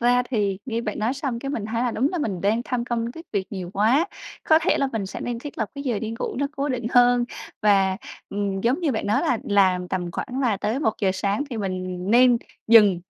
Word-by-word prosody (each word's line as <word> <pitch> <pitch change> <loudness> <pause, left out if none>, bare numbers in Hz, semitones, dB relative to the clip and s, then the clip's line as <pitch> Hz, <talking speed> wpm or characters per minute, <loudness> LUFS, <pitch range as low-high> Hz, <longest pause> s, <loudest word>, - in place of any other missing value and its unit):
ra 245 +1 +4
thì 205 -5 0
nghe 230 -2 -1
bạn 215 -3 -4
nói 225 +5 0
xong 270 -4 -3
cái 275 +3 -4
mình 230 -7 -3
thấy 230 +2 -1
là 250 - +1
đúng 250 +5 +1
là 355 - -1
mình 200 - -2
đang 215 +5 +1
tham 250 -3 -2
công 235 -1 -2
tiếc 330 +2 -11
việc 195 -3 -1
nhiều 185 -3 -5
quá, 235 - +3 0.4
có 315 - +6
thể 360 - +2
là 275 - +1
mình 210 -4 -2
sẽ - - -7
nên 240 -1 -3
thiết 290 +4 -9
lập 220 -3 -1
cái 280 - -6
giờ 240 -6 0
đi 220 +1 -4
ngủ - - -3
nó 285 +2 +1
cố 280 +1 -1
định 245 -3 -2
hơn 245 -1 +5 0.4
và, 195 -2 +4 0.3
ừm, 200 -1 -2
giống 245 - +1
như 315 -6 +1
bạn 220 - -2
nói 210 - +2
là 245 - +1
làm 185 -3 +2
tầm 180 -2 -2
khoảng 255 +9 -4
là 235 -7 +2
tới 215 +6 -1
1:00 215 -6 +1
sáng 200 +6 -1
thì 235 - -4
mình 185 -2 -3
nên 245 +1 +6 0.3
dừng, 210 -6 +6
225 Hz, 245 wpm, -24 LUFS, 200-250 Hz, 0.4 s, có